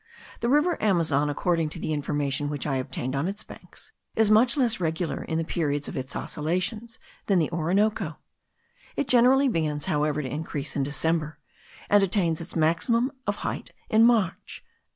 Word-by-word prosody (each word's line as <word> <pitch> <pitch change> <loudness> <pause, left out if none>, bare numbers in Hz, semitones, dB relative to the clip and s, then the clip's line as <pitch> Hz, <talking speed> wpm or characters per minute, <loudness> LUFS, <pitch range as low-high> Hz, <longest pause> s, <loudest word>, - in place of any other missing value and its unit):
The 235 - 0
river 300 +6 +2
Amazon, 160 -8 +2
according 165 +2 0
to 165 - -6
the 155 - -2
information 145 -1 -1
which 145 -2 -4
I 135 -2 0
obtained 130 0 -3
on 140 +5 0
its 205 +2 -4
banks, - - -12 0.2
is 220 -1 +3
much 235 +5 +5
less 240 -6 +2
regular 165 0 -2
in 160 - -2
the 165 - 0
periods 145 -3 -1
of - - -6
its 130 +1 -5
oscillations 185 +9 -3 0.3
than 195 - +3
the 165 -2 +1
Orinoco; 185 +6 0 0.8
it - - -1
generally 255 +3 +5
begins, 155 - -1
however, 150 -3 0
to - - -4
increase 145 0 -4
in 140 - 0
December, 150 +2 -1 0.5
and 205 0 +5
attains 175 -4 +1
its 165 - -7
maximum 200 - +2 0.2
of 205 - +1
height - - -3 0.2
in 220 0 +6
March. 225 -6 +1
165 Hz, 170 wpm, -26 LUFS, 150-215 Hz, 0.8 s, in